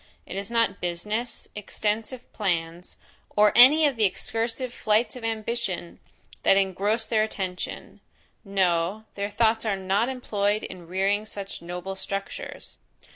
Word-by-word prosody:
It - - -7
is 195 0 -2
not 230 -1 +1
business, 210 +7 -3
extensive 215 +4 -2
plans, 175 -3 -2 0.4
or 210 0 +6
any 290 +6 +9
of 280 -4 +1
the 220 - +2
excursive 230 +5 -1
flights 215 +2 +1
of 250 - -9
ambition, 220 -5 -3 0.4
that 195 - +5
engross 200 +4 +1
their 220 -1 +2
attention; 190 -4 -4 0.4
no, 190 0 +1
their 200 0 -3
thoughts 220 +1 +2
are 210 -3 0
not 195 +5 +1
employed 210 -5 0
in 180 -2 -8
rearing 195 +3 +1
such 200 -2 -7
noble 180 +2 -5
structures. 195 +1 -6
205 Hz, 130 wpm, -26 LUFS, 190-225 Hz, 0.4 s, any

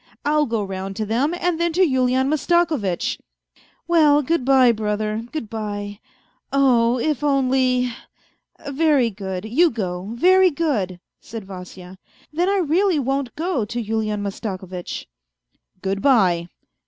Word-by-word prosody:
I'll 300 0 +2
go 225 -3 -1
round 195 0 -5
to 215 +1 -2
them, 255 +10 0
and 350 -2 0
then 340 -1 0
to 370 +3 +3
Yulian 260 -1 +1
Mastakovitch." 305 - 0 0.7
"Well, 300 -4 +4
good 330 0 0
bye, 260 -2 +5
brother; 215 +1 -2
good 310 -8 -4
bye... 205 -2 -5 0.5
Oh 245 -4 +3
1 245 - -2
if 300 -2 -1
only.... 255 -3 +2 0.7
Very 280 -4 +2
good, 190 -1 -5
you 310 +11 +3
go, 190 - -4
very 370 +6 +5
good," 255 - -2 0.2
said 225 -3 -9
Vasya, 185 -1 -10 0.2
" - - -31
then 350 +4 +1
I 400 - +2
really 360 +1 +2
won't 270 -1 -2
go 330 -6 -1
to 240 +3 -4
Yulian 215 -2 -2
Mastakovitch." 190 -3 -5 0.4
" 185 - -44
Good 195 +1 -1
bye." 185 -11 +3
245 Hz, 140 wpm, -21 LUFS, 205-300 Hz, 0.7 s, bye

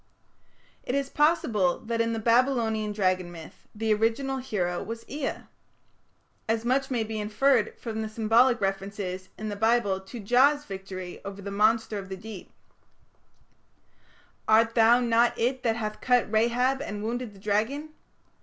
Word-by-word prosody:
It 250 - -3
is 275 0 -1
possible 230 - +2
that 230 -1 -1
in 230 0 0
the 225 - -2
Babylonian 230 -2 +2
dragon 185 -3 0
myth 165 -2 -12
the 220 0 +1
original 230 +5 0
hero 185 -9 -2
was 230 +1 -7
Ea. 285 0 -4 1.1
As 225 +1 0
much 265 +2 +1
may 240 -4 0
be 220 0 -4
inferred 215 +3 +1
from 220 -2 -5
the 220 - -4
symbolic 230 +3 +3
references 195 -1 -3
in 215 0 -5
the 205 - -4
Bible 220 -2 +2
to 190 +5 -10
Jah's 270 +7 +3
victory 190 -2 -7
over 200 0 -7
the 200 - -5
monster 215 +1 +2
of 195 -1 -9
the 190 - -5
deep: 205 -1 -10 2.0
"Art 225 +1 +4
thou 230 +1 +5
not 235 0 +2
it 255 +3 0
that 230 -3 +1
hath 215 -2 -4
cut 245 -4 +2
Rahab 245 +4 +2
and 210 -7 -5
wounded 235 -1 -4
the - - -15
dragon?" 220 +10 -1
225 Hz, 155 wpm, -27 LUFS, 205-245 Hz, 2.0 s, thou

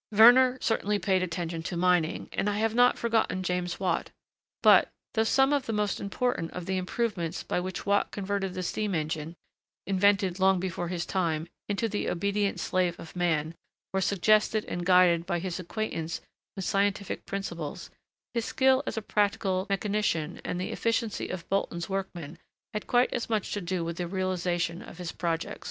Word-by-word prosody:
Werner 245 +4 +7
certainly 210 -2 +1
paid 190 -2 +1
attention 170 -2 -3
to 175 +1 -4
mining, 175 -2 +2
and 205 - 0
I 205 - -1
have 220 +1 +1
not 245 +1 +5
forgotten 225 -5 0
James 180 -1 -2
Watt. 180 -3 0 0.5
But, - - +7 0.2
though 220 - +3
some 270 +5 +3
of 280 -3 0
the 225 - -1
most 210 -2 0
important 200 -4 -1
of 180 -1 -5
the 190 +1 -1
improvements 185 -3 -2
by - - -1
which 185 0 -5
Watt 200 0 +2
converted 195 -2 -3
the 185 - -3
steam 205 +2 -1
engine, 155 +1 -3 0.5
invented 195 -1 +2
long 190 0 +4
before 175 -1 -3
his 175 0 -3
time, 165 -4 -1 0.2
into 205 +3 0
the 205 -1 -2
obedient 200 +3 0
slave 180 -2 0
of 165 - -10
man, 165 -3 0 0.4
were 190 - +1
suggested 215 +3 +3
and 175 0 -4
guided 180 -2 +5
by 175 -2 0
his 180 +1 -4
acquaintance 170 -3 -3 0.4
with 190 -2 -4
scientific 200 0 0
principles, 170 -6 -5 0.4
his 235 -1 0
skill 265 0 +3
as - - -3
a 220 - -2
practical 200 -3 0
mechanician, 195 -5 -1
and 180 - -3
the 185 - -3
efficiency 230 -2 -1
of 180 -2 -5
Bolton's 180 -3 -1
workmen 175 -5 -4 0.3
had 210 - -4
quite 245 +1 +3
as 240 - -2
much 215 -3 -1
to 205 - -2
do 175 -1 -2
with 170 0 -4
the 175 - -2
realisation 180 -1 -1
of 225 - -11
his 180 -2 -5
projects. 165 -1 -2
190 Hz, 175 wpm, -28 LUFS, 175-210 Hz, 0.5 s, Werner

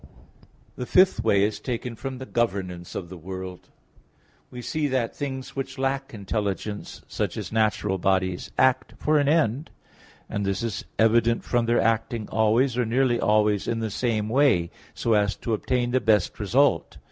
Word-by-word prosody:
The 125 - -4
fifth 185 +1 +4
way 100 0 +3
is 105 +1 0
taken 120 -1 -4
from 130 +3 -6
the 130 - -7
governance 95 -8 -2
of 85 - -5
the 90 -1 -9
world. 95 +1 -8 0.8
We 125 - -9
see 155 +2 -1
that 130 -4 -1
things 130 -2 -5
which 135 0 -4
lack 135 0 -1
intelligence, 105 -1 -4
such - - -3
as - - -5
natural 105 -3 +1
bodies, 95 -1 0
act 130 0 +2
for 155 0 +2
an 145 - +1
end, 150 -2 +1 0.6
and 105 -1 -3
this 100 +3 -1
is 110 -6 -3
evident 115 +1 +3
from 120 -1 0
their 120 +1 +3
acting 115 -1 0
always, 115 +4 +2
or - - +3
nearly 120 +1 +1
always, 105 -1 +2
in 115 - 0
the 110 -2 -3
same 110 -1 -1
way, 115 -9 +3 0.2
so 115 - +1
as 105 -1 +2
to 115 - -3
obtain 120 +2 0
the 130 +1 +2
best 105 -5 +2
result. 110 -2 +2
115 Hz, 170 wpm, -25 LUFS, 105-130 Hz, 0.8 s, fifth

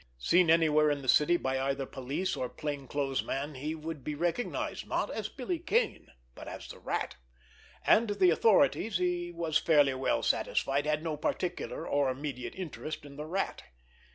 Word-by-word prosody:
Seen 170 - +3
anywhere 155 -2 +5
in 145 -1 -1
the - - -7
city 150 +6 +5
by 130 -4 -1
either 135 0 -1
police 135 +9 -3
or 125 - -3
plain 145 -3 -5
clothes 135 -2 -1
man 140 +3 -3
he 150 +4 -4
would 155 -3 -6
be 150 - -3
recognized, 175 +9 -2
not - - -1
as - - -3
Billy 355 -3 -3
Kane, 430 +7 0 0.3
but - - -10
as - - -7
the - - -10
Rat—and 60 - -2
the 195 -3 +4
authorities, 220 - +3
he 175 -1 -1
was 165 -2 0
fairly 145 -4 +4
well 130 0 0
satisfied, 140 +2 +1
had 155 0 0
no 160 -2 -2
particular 175 +4 -3
or 140 -1 +2
immediate 130 -3 -4
interest 155 -4 -6
in 140 -1 -11
the 150 +2 -6
Rat. 190 +4 -2
150 Hz, 170 wpm, -31 LUFS, 135-175 Hz, 0.3 s, anywhere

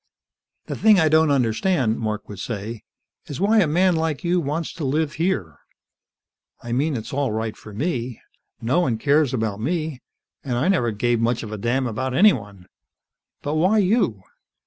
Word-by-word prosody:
"The - - -5
thing 215 -3 +5
I 160 -2 +4
don't 160 0 +4
understand," 125 - +1
Mark 110 -2 -3
would 100 -2 -9
say, 110 +1 -5 0.5
"is 145 - -6
why 215 +3 +4
a 185 - +4
man 180 +4 +3
like 160 -3 -1
you 175 +1 +2
wants 155 +2 -3
to 165 - -7
live 150 +3 0
here. 110 - -1 1.0
I 120 - -6
mean, 140 +3 0
it's 110 - -7
all 140 -3 0
right 110 0 -3
for 105 - -12
me. 125 - -3 0.4
No 120 +9 +1
one 125 -10 +1
cares 145 +2 +2
about 110 -5 -2
me, 155 +1 -2 0.4
and 125 -3 -2
I 140 +10 +1
never 145 -12 +2
gave 115 +2 0
much 120 +1 0
of 110 - -7
a 110 - -4
damn 125 +5 0
about 125 +3 -3
anyone. 100 - +2 0.8
But 145 - -2
why 185 +7 +3
you?" 190 - +1
130 Hz, 175 wpm, -22 LUFS, 115-160 Hz, 1.0 s, thing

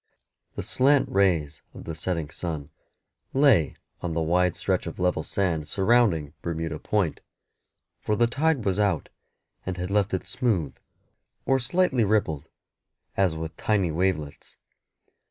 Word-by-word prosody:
The - - -3
slant 140 +2 +3
rays 85 -7 +1
of - - -9
the 80 - -5
setting 80 -1 -2
sun 80 -5 -4 0.6
lay 130 - +4 0.3
on 85 -2 -3
the 85 - +1
wide 90 +2 +2
stretch 95 -2 -1
of 85 - -6
level 90 -3 +1
sand 85 -6 -1
surrounding 95 -8 +2
Bermuda 80 -2 -3
Point, 100 -7 0 0.8
for 105 - 0
the 120 - +4
tide 140 +1 +1
was 95 +1 +1
out, 100 -7 +1 0.5
and 90 -1 -4
had 90 +2 -4
left 100 -1 +2
it 95 - -5
smooth, 105 - 0 0.7
or 135 0 +3
slightly 135 -3 +2
rippled 80 -8 0 0.7
as 95 -4 +2
with 80 0 -5
tiny 100 -6 +1
wavelets. 80 -3 -2
90 Hz, 135 wpm, -26 LUFS, 80-105 Hz, 0.8 s, lay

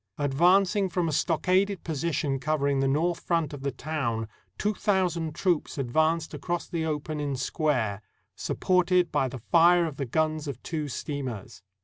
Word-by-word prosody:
Advancing 180 +8 +3
from 175 -1 0
a - - -1
stockaded 185 +5 +1
position 150 -3 -1
covering 140 -1 0
the 135 - +2
north 165 +5 +1
front 165 -4 -1
of 145 - -7
the 140 - -1
town, 130 -6 -3 0.3
two 210 +1 0
thousand 175 -7 0
troops 175 -3 0
advanced 155 +5 +1
across 170 +4 -3
the 170 -2 -2
open 155 -1 -3
in 145 -2 -2
square, 125 -7 -1 0.3
supported 180 -1 +1
by 135 - +1
the 130 -1 -7
fire 175 0 +6
of 155 -4 -5
the 140 - -2
guns 155 +3 0
of 140 -5 -5
two 155 -3 -3
steam 140 0 -4
ers. 110 -2 -9
155 Hz, 160 wpm, -27 LUFS, 140-175 Hz, 0.3 s, fire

